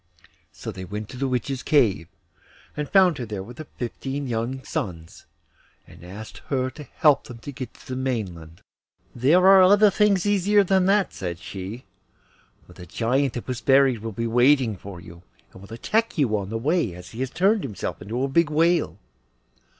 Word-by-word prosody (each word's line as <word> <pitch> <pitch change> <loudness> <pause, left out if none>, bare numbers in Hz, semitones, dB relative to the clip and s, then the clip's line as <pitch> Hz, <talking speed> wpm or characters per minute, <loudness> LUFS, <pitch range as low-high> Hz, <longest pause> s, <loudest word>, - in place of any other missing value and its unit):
So - - -7
they 95 - -8
went 105 +3 -6
to 125 - -9
the 135 +1 -1
Witch's 130 +1 -2
cave, 110 - +2 0.7
and 150 -1 -4
found 185 -6 +4
her 120 - -3
there 105 -3 -5
with 120 +7 -12
her 155 - -8
fifteen 135 +3 -4
young 120 +3 -3
sons, 85 -4 -6 0.6
and 90 - -16
asked 100 +5 -10
her 130 -2 -1
to 150 +3 -11
help 150 -3 +4
them 125 - -10
to 145 +5 -8
get 130 -3 -8
to - - -17
the 130 - -4
mainland. 95 -11 -4 0.5
'There 150 +10 +3
are 195 0 +8
other 205 +3 +6
things 200 -2 +2
easier 205 0 +3
than 190 -1 +2
that,' 200 0 +2
said 85 -3 -5
she, 100 +5 -8 0.8
'for 90 - -16
the 90 0 -12
Giant 125 - 0
that 120 - -6
was 125 -2 -4
buried 135 -3 +4
will 110 +1 -5
be 115 +3 -3
waiting 120 0 +3
for 95 -1 -10
you, 85 -1 -13 0.3
and 95 - -13
will 100 - -14
attack 220 - -1
you 125 -8 +2
on 100 -2 -3
the 115 - -3
way, 135 - 0
as 90 0 -11
he 115 - -10
has 130 0 -2
turned 195 - +2
himself 110 - -5
into 115 +7 -3
a - - +1
big 155 +3 +2
whale. 165 +2 +1
130 Hz, 190 wpm, -24 LUFS, 105-155 Hz, 0.8 s, are